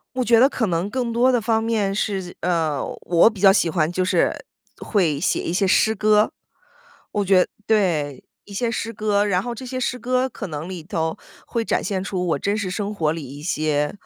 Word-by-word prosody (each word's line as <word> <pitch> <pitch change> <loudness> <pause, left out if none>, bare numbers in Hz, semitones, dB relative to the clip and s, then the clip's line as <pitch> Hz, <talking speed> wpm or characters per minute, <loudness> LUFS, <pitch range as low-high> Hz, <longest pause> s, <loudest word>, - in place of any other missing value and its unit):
我 255 - +1
觉 230 -1 +4
得 265 - +7
可 230 -6 -1
能 170 +2 -1
更 245 -3 -1
多 245 +3 +3
的 245 -2 +2
方 225 0 +1
面 210 -4 0
是 195 -3 -3
呃， 160 -5 0 0.2
我 175 +5 +5
比 200 -3 -10
较 195 -1 +8
喜 185 -3 +2
欢 165 0 0
就 185 +1 0
是 185 - 0 0.3
会 165 -9 0
写 - - 0
一 - - -2
些 195 +2 +1
诗 220 +3 +3
歌。 210 +1 +3 0.8
我 205 -1 -1
觉 185 -1 +4 0.2
对， 170 -10 +1 0.2
一 205 - -13
些 235 +3 0
诗 230 0 -3
歌。 210 -1 +1
然 185 -2 +1
后 240 - -4
这 255 +3 -8
些 255 0 -4
诗 250 0 -1
歌， 255 +1 0
可 215 -4 -7
能 155 +1 -6
里 175 -4 -7
头 160 -1 -2 0.3
会 230 -1 -2
展 - - 0
现 195 -2 -2
出， 185 -3 -2
我 150 - +1
真 200 +6 -1
实 195 -4 -3
生 205 +2 -3
活 155 -5 0
里 160 -2 -4
一 140 +3 -10
些， 150 -2 0
200 Hz, 230 characters per minute, -22 LUFS, 170-225 Hz, 0.8 s, 较